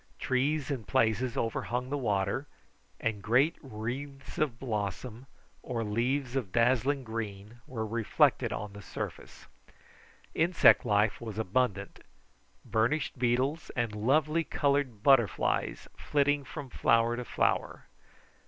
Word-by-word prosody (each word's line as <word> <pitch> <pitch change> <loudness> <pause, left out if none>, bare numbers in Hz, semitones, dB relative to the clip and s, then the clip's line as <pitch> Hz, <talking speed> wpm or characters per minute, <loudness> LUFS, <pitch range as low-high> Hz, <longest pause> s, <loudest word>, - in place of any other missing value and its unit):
Trees 140 +3 0
in 130 -5 -3
places 110 +5 +1
overhung 125 +3 -2
the - - 0
water, 105 +3 0 0.5
and 110 -3 -2
great 130 - +3
wreaths 135 +3 -6
of 140 -7 0
blossom 110 +1 -4 0.3
or 120 -3 -3
leaves 120 +5 -1
of 120 -9 -2
dazzling 130 +4 +2
green 110 -1 -6
were 110 -3 -4
reflected 115 0 +2
on 105 -1 -5
the 100 - -9
surface. 85 - -7 0.9
Insect 165 -3 +5
life 105 0 +2
was 110 -3 -6
abundant: 105 -2 -1 0.7
burnished 135 +6 0
beetles 130 +6 0
and 120 -3 -1
lovely 150 +9 +2
coloured 140 -8 0
butterflies 130 -7 +2
flitting 145 0 +1
from 140 -4 -8
flower 115 +1 +3
to 125 - -4
flower. - - -1
120 Hz, 115 wpm, -30 LUFS, 110-140 Hz, 0.9 s, Insect